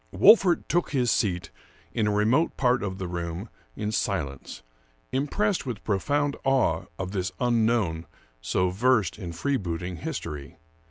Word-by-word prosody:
Wolfert 195 -5 +6
took 175 +1 +1
his 125 -4 +2
seat 90 -6 0 0.4
in 110 -3 +1
a - - +2
remote 110 +10 +2
part 125 -1 +2
of 95 -2 -3
the 95 -1 -4
room 85 +3 -4 0.3
in 105 0 -2
silence, 70 - -3 0.5
impressed 150 +6 0
with 115 -4 -5
profound 145 +8 0
awe 130 -12 +2
of 95 -1 -4
this 95 -1 -2
unknown, 115 -9 +1 0.3
so 90 +10 +1
versed 110 -2 +2
in 90 -5 -5
freebooting 90 - -2
history. 85 - -6
105 Hz, 140 wpm, -26 LUFS, 90-130 Hz, 0.5 s, Wolfert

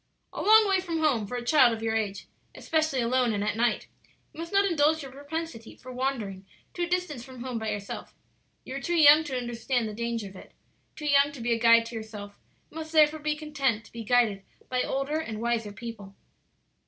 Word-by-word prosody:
"A - - -4
long 435 0 +6
way 385 -1 +3
from 345 -3 -3
home 275 -10 +1
for 250 - -5
a 240 - -6
child 255 -3 +5
of 225 0 -6
your 225 0 0
age; 200 -3 -2 0.3
especially 315 -5 0
alone 245 0 +1
and 205 -1 -1
at 210 - -1
night. 230 -1 +1 0.5
You - - -13
must 335 +2 -6
not 395 0 +4
indulge 315 -3 +2
your 270 - -9
propensity 285 -4 -6
for 255 - -11
wandering 245 -7 -3 0.3
to 350 - -5
a 345 - +1
distance 350 -8 -2
from 255 -2 -10
home 250 -3 -3
by 220 -1 -3
yourself. 205 -1 -6 0.5
You 260 - -8
are - - -6
too 345 - -1
young 305 -1 +7
to 265 -3 -3
understand 240 0 -2
the 215 - -6
danger 230 -1 -3
of 190 - -13
it; - - -13 0.4
too 300 - -7
young 285 0 +4
to 280 - -9
be 235 0 0
a 230 - -1
guide 230 0 +6
to 230 - -8
yourself, 210 -2 -8 0.3
and 315 - -11
must 315 0 -7
therefore 310 0 +5
be 300 0 -1
content 275 -8 -1
to - - -17
be 230 -1 -7
guided 225 -4 +2 0.3
by 255 0 0
older 275 +5 -1
and 225 -9 -5
wiser 230 -2 -1
people. 205 -2 -9
250 Hz, 220 wpm, -27 LUFS, 225-300 Hz, 0.5 s, young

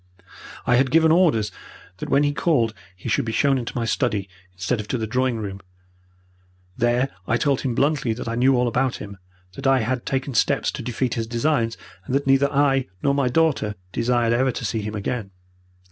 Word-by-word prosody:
I 120 0 +4
had 130 +1 +3
given 160 +3 +4
orders 155 - +3 0.5
that - - -6
when 140 - +4
he 145 0 +1
called 130 -8 +1 0.2
he 90 - -9
should - - +1
be 115 - -3
shown 135 +3 +2
into 120 +1 -5
my 115 - 0
study 110 -4 0 0.3
instead 90 +6 -2
of 105 - -5
to 125 - -1
the 110 - -2
drawing 125 +2 0
room. 100 -2 -5 1.1
There 120 +2 +1 0.2
I 115 - +2
told 140 0 +1
him 125 -3 -2
bluntly 140 -3 +1
that 115 - -7
I 115 - -2
knew 130 +2 +3
all 125 0 +2
about 125 +2 0
him, 100 -1 -9 0.3
that 135 +6 -3
I 135 -2 +4
had 125 +2 -1
taken 135 0 -2
steps 115 - +2
to - - -6
defeat 125 +1 -2
his 115 -1 -2
designs, 115 -1 0 0.3
and 130 - -2
that 140 - +1
neither 135 +1 +3
I 135 -2 +2 0.2
nor 140 - +3
my 140 -2 +1
daughter 135 -8 +1 0.2
desired 120 +1 +1
ever 130 +2 +2
to 115 - -5
see 110 +2 -1
him 105 +1 -5
again. 105 0 -3
125 Hz, 205 wpm, -23 LUFS, 115-135 Hz, 1.1 s, I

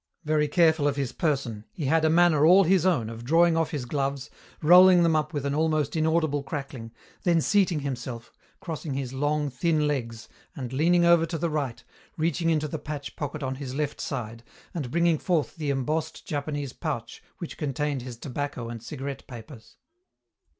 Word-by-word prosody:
Very 150 0 +2
careful 160 -2 +3
of 140 - 0
his 140 -4 -2
person, 135 -9 -2
he 160 -7 -5
had 160 +4 +2
a 160 - +4
manner 165 -2 +4
all 185 +5 +7
his 185 0 +3
own 135 -12 +1
of 115 +1 -8
drawing 165 +5 +4
off 165 -1 +1
his 145 -5 -4
gloves, 140 0 -3 0.3
rolling 180 +2 +8
them 165 -1 +3
up 155 -1 0
with 145 -3 -3
an 140 - 0
almost 155 -1 0
inaudible 160 -2 +1
crackling, 135 -5 -6 0.3
then 170 -2 +3
seating 180 -3 +2
himself, 125 -4 -6 0.3
crossing 155 -4 -5
his 135 -2 -4
long, 145 +1 0
thin 155 +3 +1
legs, 115 -6 -3 0.3
and 130 -5 -6
leaning 170 +5 +3
over 170 -1 +5
to 165 0 -3
the 165 +1 -1
right, 135 -6 -3 0.3
reaching 165 +1 0
into 155 -2 +1
the 155 +1 -5
patch 145 -1 -6
pocket 145 0 -5
on 130 0 -2
his 130 -2 -6
left 150 0 -2
side 115 -4 -5 0.3
and 145 -8 -4
bringing 170 +1 +2
forth 170 -5 -1
the 150 -3 -3
embossed 150 +4 -2
Japanese 145 -2 -3
pouch 120 -8 -5 0.2
which 170 - -7
contained 145 -1 -2
his 120 -1 -8
tobacco 130 -2 -5
and 115 -1 -7
cigarette 135 +2 -6
papers. 115 0 -12
150 Hz, 180 wpm, -26 LUFS, 135-160 Hz, 0.3 s, rolling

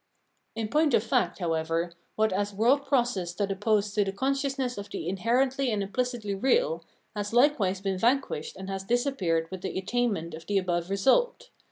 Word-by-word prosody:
In 225 -1 -2
point 300 +3 +3
of 210 - +2
fact, 180 -6 +1
however, 165 0 -1 0.2
what 215 -2 +2
as 205 +1 -1
world 260 +7 +3
process 240 -10 +1
stood 195 +3 -2
opposed 205 +1 +1
to 210 - +3
the 195 - -2
consciousness 270 +3 -1
of 200 - -8
the - - -5
inherently 250 +8 +1
and 210 -3 0
impHcitly 215 -2 -2
real, 170 - +2 0.3
has 205 0 -2
hkewise 225 -7 +2
been 190 -2 -1
vanquished 240 - 0
and 190 0 -7
has 195 0 -4
disappeared 200 - 0
with 190 -1 -6
the 190 - -4
attainment 195 -5 -1
of 160 +1 -9
the 205 - +1
above 175 -2 -1
result. 485 - +2
205 Hz, 175 wpm, -28 LUFS, 185-250 Hz, 0.3 s, point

